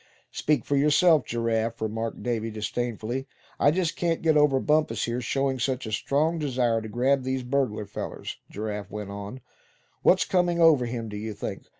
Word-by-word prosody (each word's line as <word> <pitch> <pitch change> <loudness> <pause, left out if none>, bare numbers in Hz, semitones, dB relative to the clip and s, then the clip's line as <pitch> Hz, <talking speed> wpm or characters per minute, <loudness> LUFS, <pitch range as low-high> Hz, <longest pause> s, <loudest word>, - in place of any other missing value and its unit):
"Speak 145 -6 0
for 145 - 0
yourself, 150 +2 +4
Giraffe," 115 0 -1
remarked 110 +1 -3
Davy, 115 -2 -1
disdainfully. 120 +3 -3 0.3
"I - - +5
just 170 +1 0
can't 170 -1 -1
get 160 -1 +4
over 145 -3 +4
Bumpus, 155 +3 +1
here, 120 +1 -2
showing 135 +1 0
such 130 +1 -1
a 110 - -5
strong 150 +9 +1
desire 125 -6 +1
to 110 - -7
grab 130 +5 +2
these 130 0 -2
burglar 125 -5 -1
fellers," - - -6
Giraffe 105 -1 -5
went 105 -2 -6
on. 100 +5 -7 0.6
"What's 185 - +4
comin' 175 -2 +1
over 155 -7 +5
him, 115 -1 -4
do 105 -1 -6
you 110 0 -5
think? - - -6
125 Hz, 175 wpm, -26 LUFS, 110-145 Hz, 0.6 s, I